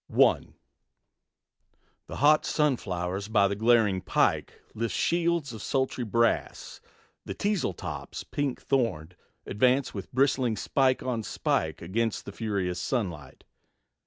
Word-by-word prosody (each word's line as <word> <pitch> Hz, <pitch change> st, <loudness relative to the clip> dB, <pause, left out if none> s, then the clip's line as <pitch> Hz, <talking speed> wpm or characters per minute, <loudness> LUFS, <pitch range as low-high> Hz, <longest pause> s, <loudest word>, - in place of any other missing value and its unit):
I. -, -, +4 dB, 1.6 s
The -, -, -7 dB
hot 150 Hz, +2 st, +4 dB
sunflowers 100 Hz, -, -1 dB
by 105 Hz, -3 st, +3 dB
the 100 Hz, -, -2 dB
glaring 110 Hz, -3 st, +3 dB
pike 90 Hz, -, 0 dB
Lift 115 Hz, +1 st, -2 dB
shields 170 Hz, -5 st, 0 dB
of 110 Hz, -, -8 dB
sultry 130 Hz, 0 st, -1 dB
brass; 115 Hz, +1 st, -1 dB, 0.4 s
the -, -, -6 dB
teasel 200 Hz, -, 0 dB
tops, -, -, -6 dB
Pink 145 Hz, -3 st, -3 dB
thorned, 90 Hz, -, -1 dB, 0.3 s
advance 125 Hz, +6 st, +2 dB
with 100 Hz, -3 st, -7 dB
bristling 130 Hz, -3 st, +2 dB
spike 130 Hz, +5 st, +1 dB
on 125 Hz, -3 st, -2 dB
spike 80 Hz, -6 st, -1 dB
Against 110 Hz, +5 st, -1 dB
the -, -, -7 dB
furious 95 Hz, -5 st, -2 dB
sunlight. 85 Hz, -, -3 dB
115 Hz, 120 wpm, -27 LUFS, 95-130 Hz, 1.6 s, I